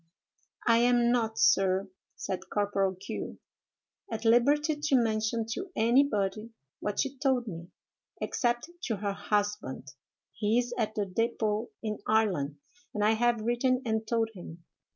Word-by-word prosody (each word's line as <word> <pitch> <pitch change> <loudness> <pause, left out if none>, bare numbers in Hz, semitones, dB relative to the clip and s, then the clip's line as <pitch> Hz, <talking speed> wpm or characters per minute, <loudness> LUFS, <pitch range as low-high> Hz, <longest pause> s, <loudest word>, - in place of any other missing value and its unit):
"'I 230 -1 +5
am 240 0 +4
not, 225 -2 0
sir,' 185 +7 +3 0.3
said 185 0 -5
Corporal 200 -2 +1
Q——, 185 - -6 0.7
'at 225 0 -4
liberty 290 +7 +4
to 295 -1 +1
mention 225 -1 +1
to 380 - -4
anybody 220 -3 +2 0.3
what 205 - -3
she 275 -1 -4
told 265 -4 +2
me, 170 -5 -7 0.5
except 240 +5 -1
to 225 - 0
her 200 0 -2
husband. 205 -11 -2 0.4
He 215 +1 +1
is 245 0 0
at 220 -3 -1
the 205 - 0
dépôt 220 +2 -1 0.2
in 215 -1 -3
Ireland, 200 -10 +1 0.4
and 210 - 0
I 215 - +5
have 235 0 +2
written 250 +2 +1
and 220 -1 -1
told 225 -1 +1
him. 170 -3 -10
220 Hz, 140 wpm, -29 LUFS, 205-240 Hz, 0.7 s, I